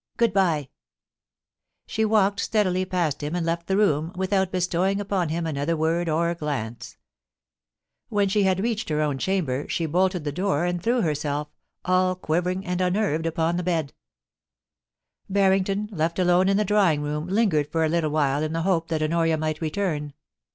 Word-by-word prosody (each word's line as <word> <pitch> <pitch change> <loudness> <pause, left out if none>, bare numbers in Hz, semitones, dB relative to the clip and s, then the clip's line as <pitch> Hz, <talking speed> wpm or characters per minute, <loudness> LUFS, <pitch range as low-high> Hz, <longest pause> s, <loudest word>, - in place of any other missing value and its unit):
Good 235 -3 +2
bye' 165 -8 +1 1.2
She 220 - -1
walked 205 -2 +2
steadily 185 -4 +1
past 175 -7 -1
him 150 +3 -3
and 175 -2 -1
left 170 0 -2
the 190 - +1
room, 165 -6 +2
without 190 0 0
bestowing 185 +2 0
upon 195 -4 -1
him 165 +1 -2
another 155 +1 -1
word 165 +2 0
or 170 +2 +1
gUmce 140 -8 -5 1.1
AVhen 200 -2 +1
she 210 - +2
had 190 -1 +2
reached 230 -3 -2
hier 150 -1 0
own 145 -3 -1
chamber 150 -8 -1
she 165 - -1
bolted 180 +2 +1
the 145 - -2
door 180 0 0
and 175 -1 -1
threw 240 +5 +1
herself, 150 -2 -2 0.4
all 185 0 +2
quivering 180 +2 -1
and 180 0 -2
unnerved, 180 -4 0
upon 165 +1 0
the - - -1
bed 165 -5 -1 1.4
Barrington, 195 +1 +2
left 165 -2 -1
alone 180 +1 +3
in 195 - +3
the 210 - +1
drawing 185 -7 +2
room, 150 +2 -3
lingered 185 -8 +1
for 160 -1 +1
a - - 0
little 165 -1 +1
while 145 -2 +1
in 155 0 -2
the 165 0 -1
hope 170 -3 +1
that 160 -2 -1
Honoria 165 0 +1
might 155 0 -2
return. 155 -3 -2
170 Hz, 170 wpm, -24 LUFS, 155-190 Hz, 1.4 s, alone